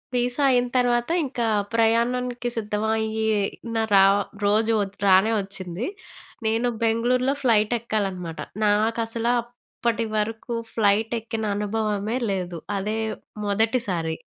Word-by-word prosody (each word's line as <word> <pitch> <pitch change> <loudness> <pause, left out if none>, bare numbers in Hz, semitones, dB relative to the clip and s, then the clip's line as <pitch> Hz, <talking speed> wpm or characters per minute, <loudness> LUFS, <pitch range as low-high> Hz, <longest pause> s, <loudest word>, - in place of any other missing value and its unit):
Visa 245 +3 +1
అయిన 245 -1 +3
తర్వాత 240 0 +2 0.2
ఇంకా 245 -4 -2 0.3
ప్రయాణానికి 240 +2 +1
సిద్ధం 210 -1 -2
అయ్యిన 220 +1 -1 0.2
ర - - +7 0.5
రోజు 215 +2 +3 0.3
రానే 190 +3 +5
వచ్చింది. 195 +2 -4 0.6
నేను 225 +3 +1
బెంగుళూరులో 250 +4 +2
ఫ్లైట్ 220 -2 +3
ఎక్కాలనమాట. 190 -7 -3 0.3
నాకు 215 +3 +2
అసలు 230 +1 -1
అప్పటివరకు 230 -1 -3 0.2
ఫ్లైట్ 215 +1 +2
ఎక్కిన 225 0 -4
అనుభవమే 210 +1 -1
లేదు. 180 -3 -3 0.2
అదే 210 +3 -2 0.5
మొదటిసారి. 200 -6 0
225 Hz, 100 wpm, -24 LUFS, 205-235 Hz, 0.6 s, ర